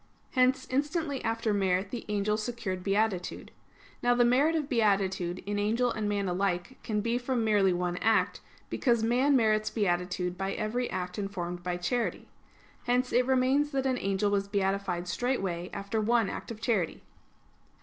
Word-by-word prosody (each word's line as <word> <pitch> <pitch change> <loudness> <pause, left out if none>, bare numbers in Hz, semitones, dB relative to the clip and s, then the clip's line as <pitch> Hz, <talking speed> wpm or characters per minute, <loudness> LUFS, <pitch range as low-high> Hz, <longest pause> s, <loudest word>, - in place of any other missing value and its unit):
Hence 260 0 +3
instantly 290 +1 -1
after 225 -1 0
merit 195 -1 +1
the 240 - -5
angel 210 0 +1
secured 215 -4 -4
beatitude. 195 -2 -1 0.5
Now 245 0 +3
the 240 0 +4
merit 280 +7 +3
of 305 -3 -1
beatitude 195 -7 +1
in 205 0 -2
angel 230 +4 +1
and 215 -2 -2
man 200 -1 0
alike 180 +5 -1
can 210 -2 -1
be 235 +3 0
from 245 -1 -1
merely 205 -3 +3
one 175 0 -1
act; 225 +3 +2 0.3
because 235 -4 +1
man 255 +5 +3
merits 215 -3 +3
beatitude 180 -3 -1
by 195 0 -1
every 235 +3 -2
act 180 +2 -4
informed 180 -3 -4
by 175 0 -2
charity. 230 +7 -2 0.6
Hence 250 +1 +1
it 245 +1 +3
remains 265 +3 +3
that 270 -1 0
an 260 -2 +1
angel 195 +1 0
was 200 -1 +1
beatified 195 -3 -1
straightway 185 -5 -1
after 200 +2 -2
one 230 -1 +2
act - - -7
of 230 -2 -7
charity. 215 -8 -1
215 Hz, 160 wpm, -29 LUFS, 190-245 Hz, 0.6 s, the